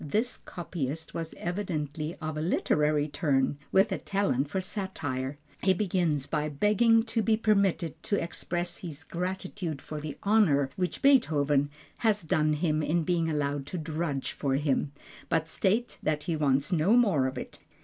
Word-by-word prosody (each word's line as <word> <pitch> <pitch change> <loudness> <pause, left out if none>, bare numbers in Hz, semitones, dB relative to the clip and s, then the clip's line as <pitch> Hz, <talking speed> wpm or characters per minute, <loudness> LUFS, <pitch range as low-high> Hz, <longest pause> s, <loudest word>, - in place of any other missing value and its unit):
This 215 - 0
copyist 160 -3 -5
was 165 -1 -5
evidently 160 -4 -3
of 155 -2 -4
a 155 - -2
literary 150 -2 +2
turn, 145 -2 +1
with 195 +3 +4
a - - -1
talent 190 -9 0
for 190 - -1
satire. 155 -9 -3 0.3
He 190 0 +3
begins 175 -7 0
by 150 0 -1
begging 215 +9 +4
to 225 0 0
be 220 0 +2
permitted 200 -7 +1
to 205 - +1
express 175 0 -3
his 160 -3 -7
gratitude 180 -2 -4
for 150 +2 -7
the 150 -1 -6
honor 165 -11 +3
which 180 -1 -2
Beethoven 150 - +4 0.3
has 215 -4 +2
done 155 -1 +2
him 155 0 +1
in 165 +2 +1
being 165 0 +1
allowed 145 -2 -1
to 180 - -4
drudge 155 -3 -2
for 135 -2 -1
him, 140 0 0 0.4
but 160 0 +1
states 210 +8 0
that 150 -1 -1
he 170 -2 -1
wants 140 +1 +1
no 175 +4 +3
more 180 - +3
of 130 - -5
it. - - -7
160 Hz, 160 wpm, -29 LUFS, 145-190 Hz, 0.4 s, with